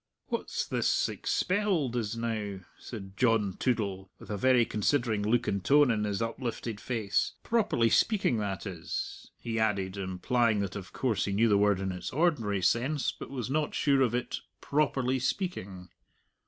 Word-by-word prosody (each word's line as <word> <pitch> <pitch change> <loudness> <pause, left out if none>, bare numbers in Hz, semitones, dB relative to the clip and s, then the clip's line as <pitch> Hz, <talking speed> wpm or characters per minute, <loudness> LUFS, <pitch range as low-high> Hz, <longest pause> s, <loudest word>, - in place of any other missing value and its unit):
"What's - - -2
this - - +1
'expelled' 185 - 0
is, 115 -1 -2
now?" 110 -4 -3 0.2
said 95 -5 -8
John 110 -4 +2
Toodle, 100 -6 -1
with - - -10
a - - -1
very 125 +3 +4
considering 110 0 +1
look 115 +3 +1
and 100 -2 -1
tone 145 +2 +5
in 105 -2 0
his 105 +1 -1
uplifted 115 -2 -4
face 110 -5 0
"properly 205 - +2
speaking, 205 - +3
that 100 -2 -3
is," 90 -5 -5
he 115 -1 -3
added, 100 -3 0
implying 105 +4 +1
that 100 0 -3
of 95 -2 -7
course 115 -7 0
he 100 - -2
knew 115 +3 +3
the 105 - +5
word 105 -2 +3
in 95 -1 -2
its 90 -1 -5
ordinary 125 - +1
sense, 130 - +1
but - - -9
was 130 -2 -4
not 150 +1 0
sure 140 -2 +3
of 120 -2 +2
it 125 - -2 0.2
"properly 135 -3 +1
speaking." 125 - -3
115 Hz, 165 wpm, -29 LUFS, 100-130 Hz, 0.2 s, tone